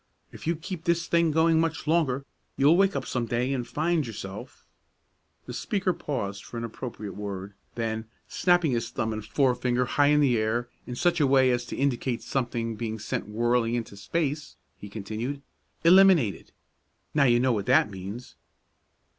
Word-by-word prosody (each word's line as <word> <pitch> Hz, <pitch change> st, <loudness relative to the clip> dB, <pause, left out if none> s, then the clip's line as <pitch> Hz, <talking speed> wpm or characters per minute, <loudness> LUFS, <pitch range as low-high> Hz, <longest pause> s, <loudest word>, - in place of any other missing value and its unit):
If -, -, -10 dB
you 170 Hz, -, +2 dB
keep 170 Hz, +1 st, -7 dB
this 170 Hz, -1 st, +1 dB
thing 170 Hz, -1 st, +3 dB
going 160 Hz, +1 st, +3 dB
much 160 Hz, -1 st, -1 dB
longer, 150 Hz, -5 st, +1 dB, 0.3 s
you'll 145 Hz, +4 st, +5 dB
wake 195 Hz, +1 st, +3 dB
up 135 Hz, -, -2 dB
some 120 Hz, -2 st, -2 dB
day 125 Hz, +4 st, 0 dB
and 125 Hz, -3 st, -3 dB
find 155 Hz, -1 st, 0 dB
yourself 100 Hz, -3 st, -8 dB, 0.4 s
" -, -, -45 dB
The -, -, -7 dB
speaker 195 Hz, -3 st, -1 dB
paused 100 Hz, -12 st, -4 dB
for 120 Hz, -, -8 dB
an 115 Hz, -, -3 dB
appropriate 115 Hz, -2 st, -6 dB
word; 100 Hz, -1 st, -6 dB, 0.2 s
then 110 Hz, -1 st, -2 dB, 0.2 s
snapping 175 Hz, -4 st, +2 dB
his 120 Hz, -2 st, -1 dB
thumb 110 Hz, -1 st, -2 dB
and 110 Hz, -1 st, -5 dB
forefinger 125 Hz, +1 st, +1 dB
high 145 Hz, +3 st, +2 dB
in 150 Hz, 0 st, +4 dB
the 130 Hz, -6 st, +3 dB
air 115 Hz, +3 st, 0 dB, 0.2 s
in 125 Hz, -, -5 dB
such 175 Hz, +5 st, +1 dB
a 145 Hz, -, +4 dB
way 130 Hz, -1 st, +5 dB
as 120 Hz, 0 st, -1 dB
to -, -, -5 dB
indicate 130 Hz, -3 st, -1 dB
something 120 Hz, -4 st, -2 dB
being 110 Hz, 0 st, -4 dB
sent 105 Hz, -1 st, -4 dB
whirling 120 Hz, +1 st, +1 dB
into 115 Hz, -4 st, -4 dB
space, 150 Hz, +6 st, -2 dB, 0.2 s
he 105 Hz, -, -10 dB
continued, 110 Hz, +7 st, -5 dB, 0.4 s
"eliminated. 170 Hz, -, +5 dB, 0.6 s
Now 145 Hz, -2 st, +4 dB
you 120 Hz, -2 st, +4 dB
know 130 Hz, 0 st, +2 dB
what 100 Hz, -3 st, -2 dB
that 140 Hz, 0 st, +4 dB
means." 100 Hz, +6 st, -8 dB
125 Hz, 175 wpm, -27 LUFS, 115-155 Hz, 0.6 s, you'll